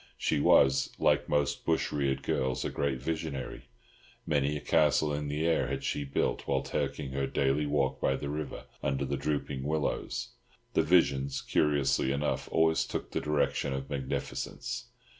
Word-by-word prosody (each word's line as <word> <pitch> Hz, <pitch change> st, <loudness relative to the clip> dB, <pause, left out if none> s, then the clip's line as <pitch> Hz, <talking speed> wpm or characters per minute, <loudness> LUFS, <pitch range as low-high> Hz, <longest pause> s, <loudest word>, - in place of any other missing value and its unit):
She 80 Hz, -, +1 dB
was, 70 Hz, -1 st, +5 dB
like -, -, +2 dB
most 75 Hz, -1 st, +1 dB
bush 80 Hz, -1 st, +1 dB
reared 70 Hz, -2 st, 0 dB
girls, 65 Hz, -1 st, 0 dB
a -, -, -2 dB
great 70 Hz, -3 st, -1 dB
visionary—many 70 Hz, -1 st, -4 dB
a -, -, -4 dB
castle 75 Hz, 0 st, +3 dB
in 75 Hz, 0 st, -2 dB
the 75 Hz, +2 st, -1 dB
air 85 Hz, -1 st, +2 dB
had 70 Hz, 0 st, -3 dB
she 70 Hz, -, -1 dB
built 70 Hz, -, -1 dB
while 65 Hz, -1 st, +1 dB
taking 70 Hz, -4 st, -2 dB
her 70 Hz, 0 st, -1 dB
daily 70 Hz, +2 st, +1 dB
walk 70 Hz, -2 st, 0 dB
by 65 Hz, -, +2 dB
the 70 Hz, +1 st, -4 dB
river 75 Hz, 0 st, -5 dB, 0.2 s
under 70 Hz, +1 st, 0 dB
the 70 Hz, +1 st, -1 dB
drooping 70 Hz, -2 st, -2 dB
willows. 75 Hz, -4 st, -2 dB, 0.4 s
The -, -, +4 dB
visions, 70 Hz, -5 st, +2 dB
curiously 70 Hz, -2 st, +2 dB
enough, 70 Hz, +2 st, -1 dB
always 80 Hz, 0 st, +3 dB
took -, -, -5 dB
the -, -, -1 dB
direction 75 Hz, -1 st, 0 dB
of 65 Hz, +1 st, -5 dB
magnificence. 65 Hz, -2 st, -3 dB
70 Hz, 160 wpm, -30 LUFS, 65-75 Hz, 0.4 s, was